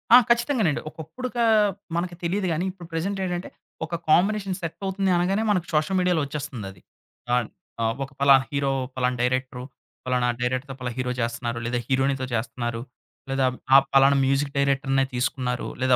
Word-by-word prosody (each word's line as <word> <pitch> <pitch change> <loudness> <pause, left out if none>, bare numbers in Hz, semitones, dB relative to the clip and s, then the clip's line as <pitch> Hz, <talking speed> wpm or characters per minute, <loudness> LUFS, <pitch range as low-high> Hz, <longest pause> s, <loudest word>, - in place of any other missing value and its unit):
ఆ! - - +12
ఖచ్చితంగానండి. 235 - +2
ఒకప్పుడు 160 - -7
కా 235 - +2 0.5
మనకు 175 +1 -2
తెలియదు 185 +3 0
గాని 170 +4 -1
ఇప్పుడు 180 -3 -12
ప్రెజెంట్ 195 +5 -2
ఏంటంటే 180 -1 -3 0.4
ఒక 170 - -4
కాంబినేషన్ 195 +3 +3
సెట్ 165 -2 -5
అవుతుంది 190 0 0
అనగానే 195 +5 +1
మనకు 180 -4 +1
షోషల్ 155 +5 +1
మీడియాలో 180 -3 +2
వచ్చేస్తుంది 140 -6 -5
అది. 90 - -18 0.5
ఆహ్, 125 -3 +1 0.4
ఆహ్, 115 0 +1
ఒక 135 - -8
ఫలానా 140 -1 +6
హీరో 140 -1 0 0.2
పలానా 125 -1 0
డైరెక్టరు 130 0 -1 0.4
పలానా 125 -1 +1
డైరెక్టర్‌తో 130 +3 -2
పలా 125 -1 -3
హీరో 125 -1 -1
చేస్తున్నారు 120 0 -2
లేదా 120 +1 -1
హీరోయినితో 135 0 +1
చేస్తున్నారు 120 0 -2 0.5
లేదా 135 0 +1
ఆహ్, 125 - -8 0.2
ఆ - - +12 0.2
పలానా 135 +1 +6
మ్యూజిక్ 135 +1 +1
డైరెక్టర్నే 135 -1 +2
తీసుకున్నారు. 125 -1 -1
లేదా 130 -1 +4
140 Hz, 160 wpm, -25 LUFS, 125-175 Hz, 0.5 s, ఆ